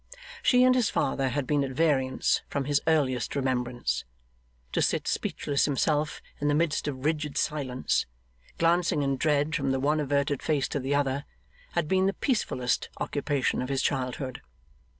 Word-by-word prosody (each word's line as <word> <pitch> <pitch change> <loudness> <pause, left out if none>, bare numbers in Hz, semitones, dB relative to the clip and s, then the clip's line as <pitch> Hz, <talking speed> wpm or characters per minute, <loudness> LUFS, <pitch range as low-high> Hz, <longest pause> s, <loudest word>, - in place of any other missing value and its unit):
She 250 0 +5
and 255 0 +6
his 250 -4 +2
father 135 0 0
had 140 +1 -1
been 145 +1 +1
at 135 - -2
variance 135 -3 +2
from 140 -2 -2
his 145 0 +2
earliest 140 -7 +1
remembrance. 125 - -1 0.7
To - - 0
sit - - +1
speechless 140 -1 0
himself 150 +2 0 0.2
in 145 - 0
the 145 - +3
midst 155 -1 +1
of 135 -1 -4
rigid 150 -2 -1
silence, 130 -4 0 0.5
glancing 165 -3 +2
in 135 0 +1
dread 150 +3 +1
from 140 -4 0
the 135 0 +1
one 150 +3 +2
averted 140 -1 0
face 145 -4 +1
to 145 - -2
the 135 +2 -1
other, 140 0 0 0.5
had 170 -3 0
been 190 +3 +3
the 195 - +1
peacefullest 170 - -1
occupation 145 -3 0
of 125 - -4
his 135 -1 0
childhood. 130 -1 -2
145 Hz, 165 wpm, -28 LUFS, 130-150 Hz, 0.7 s, and